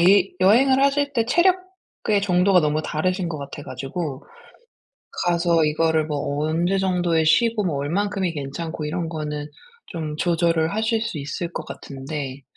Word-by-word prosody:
이 190 +2 +5
여행을 260 +8 +5
하실 280 0 +2
때 230 -3 +1
체력의 365 - 0
정도가 180 -1 +4
너무 155 0 0
다르신 180 +4 -1
것 160 -2 -4
같아 140 +1 -8
가지고 135 +2 -5 1.0
가서 170 -2 +2
이거를 155 0 +1
뭐 145 -1 -2
언제 170 +5 +1
정도에 175 -4 +1
쉬고 220 +6 +3
뭐 165 -6 -1
얼마큼이 190 +5 -1
괜찮고 155 +3 -5
이런 165 +2 -2
거는 150 -2 -4 0.4
좀 155 -3 -5
조절을 165 -1 +1
하실 220 +1 +1
수 225 -8 -3
있을 170 +5 -4
것 - - -5
같은데 140 -1 -6
170 Hz, 295 characters per minute, -23 LUFS, 150-200 Hz, 1.0 s, 이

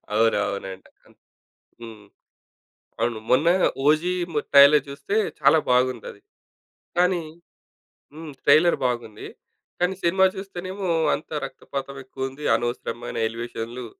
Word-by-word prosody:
అవునవునండి. 100 -4 -1 0.9
హ్మ్. 110 -3 -11 1.0
అవును. 120 -2 0
మొన్న 135 +6 +3 0.4
'ఓజీ' 155 +5 +3
ఏమో 160 -4 -2
ట్రైలర్ 140 +2 +7
చూస్తే 140 +9 -4 0.2
చాలా 160 - +5
బాగుందది. 125 -4 0 0.8
కానీ, 180 -1 +2 0.9
హ్మ్. 155 0 -9
ట్రైలర్ 155 +4 +5
బాగుంది. 120 -3 -5 0.5
కానీ, 180 +1 +1
సినిమా 190 +3 +3
చూస్తేనేమో 190 0 -6 0.3
అంతా 155 +1 -8
రక్తపాతం 135 0 -7
ఎక్కువుంది, 135 +2 -6
అనవసరమైన 120 0 -4
ఎలివేషన్లు. 115 +1 -6
140 Hz, 95 wpm, -23 LUFS, 120-165 Hz, 1.0 s, ట్రైలర్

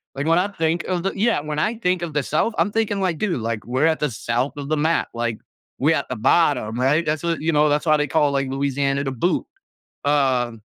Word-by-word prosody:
Like, 135 +1 -3
when 165 +2 +4
I 190 - +1
think 165 -2 -1
of 180 -1 -2
the 195 - 0
yeah, 210 -5 +1
when 150 0 -4
I 215 +8 0
think 180 -4 0
of 165 -3 -4
the 145 - 0
South, 215 +9 0
I'm 205 - +1
thinking 210 -3 0
like, 175 -4 0
"Dude, 175 - -1
like, 115 -1 -3
we're 130 +6 +1
at 160 - +1
the 150 - 0
south 120 +5 -2
of 140 -1 -5
the 155 - +1
map. 160 +3 +1
Like, 115 -2 -2 0.4
we're 155 +4 +3
at - - -3
the 125 - -3
bottom, 125 -2 +2
right?" 145 +6 +2
That's 155 +1 -1
what 170 -1 -1
you 165 +1 +1
know, 150 0 +4
that's 150 +3 0
why 155 -1 +4
they 150 0 0
call, 145 0 +2
like, 135 -1 0
Louisiana, 140 0 0
"The 135 - -2
Boot". 155 +7 0 0.6
Uh, 130 -5 +2
150 Hz, 250 wpm, -22 LUFS, 135-170 Hz, 0.6 s, when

